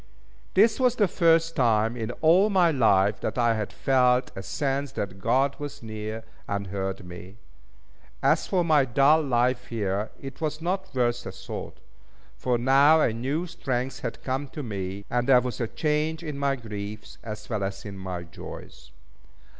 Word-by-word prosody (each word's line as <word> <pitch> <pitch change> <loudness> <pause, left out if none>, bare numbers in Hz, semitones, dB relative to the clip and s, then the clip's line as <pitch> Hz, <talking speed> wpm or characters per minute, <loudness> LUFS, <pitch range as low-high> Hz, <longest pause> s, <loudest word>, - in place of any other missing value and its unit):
This 220 +5 +5
was 250 -2 +3
the 205 -4 +3
first 165 -1 +3
time 115 -3 +2
in 115 -2 -4
all 175 +6 +5
my 180 -4 +4
life 105 -7 +3
that - - -3
I 120 -1 +3
had 110 -2 -3
felt 125 -1 +2
a 95 - -5
sense 135 +7 -2
that 95 -5 -4
God 135 +5 +2
was 145 -4 -7
near, 110 0 -5 0.2
and 100 0 -2
heard 95 -1 -3
me. 90 +3 -10 0.9
As - - +3
for 180 -2 +1
my 155 -4 +5
dull 140 +5 +4
life 125 -2 +1
here, 105 -2 -2
it 135 +1 -9
was 155 -1 -2
not 190 +3 -2
worth 120 -1 +1
a - - -4
thought; - - -8 0.6
for 125 -1 0
now 135 +6 +5
a 115 - +2
new 135 +9 -2
strength 130 -6 -3
had 115 - -6
come 135 +2 -2
to 145 +2 -7
me; 100 -3 -5
and 120 +2 -1
there 130 -2 +8
was 125 0 -4
a 115 - 0
change 155 +4 -1
in 150 -3 -5
my 140 0 0
griefs, 105 -3 -8
as 110 -2 -7
well 110 -4 -2
as 95 +1 -4
in 100 -1 -7
my 95 -2 -5
joys. 85 - -11
125 Hz, 175 wpm, -26 LUFS, 105-150 Hz, 0.9 s, there